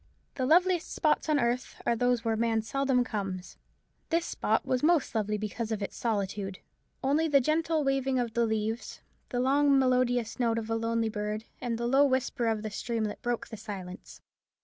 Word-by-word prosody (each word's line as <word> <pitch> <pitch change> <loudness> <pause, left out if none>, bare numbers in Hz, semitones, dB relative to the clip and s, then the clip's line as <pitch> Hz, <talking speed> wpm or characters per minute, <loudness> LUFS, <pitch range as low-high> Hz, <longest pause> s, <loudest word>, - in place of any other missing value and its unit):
The 260 -2 -1
loveliest 355 +2 +3
spots 310 0 +1
on 300 -2 +3
earth 240 +1 -1
are 235 - +2
those 245 0 +1
where 225 -1 +1
man 225 0 +1
seldom 265 +2 +1
comes. 195 -6 -5 0.5
This 335 0 +1
spot - - 0
was 255 -1 0
most 325 -1 +3
lovely 210 -1 0
because 215 +2 -4
of 215 -2 -2
its - - -5
solitude. 200 -3 -2 0.5
Only 295 +4 +2
the 285 -2 +5
gentle 315 +3 +1
waving 270 -1 +1
of 240 -3 -1
the 235 0 +2
leaves, 220 +1 -3 0.3
the 245 - -2
long 280 +2 +4
melodious 250 -3 +1
note 230 -2 +2
of 225 0 -3
a - - +2
lonely 230 0 0
bird, 210 0 -3 0.2
and 240 -3 -2
the 235 - -2
low 270 +4 +5
whisper 260 -3 +1
of 220 -1 0
the 215 - -4
streamlet, 220 +1 -3
broke 240 -1 -2
the 220 - -7
silence. 195 -3 -8
235 Hz, 185 wpm, -29 LUFS, 220-270 Hz, 0.5 s, the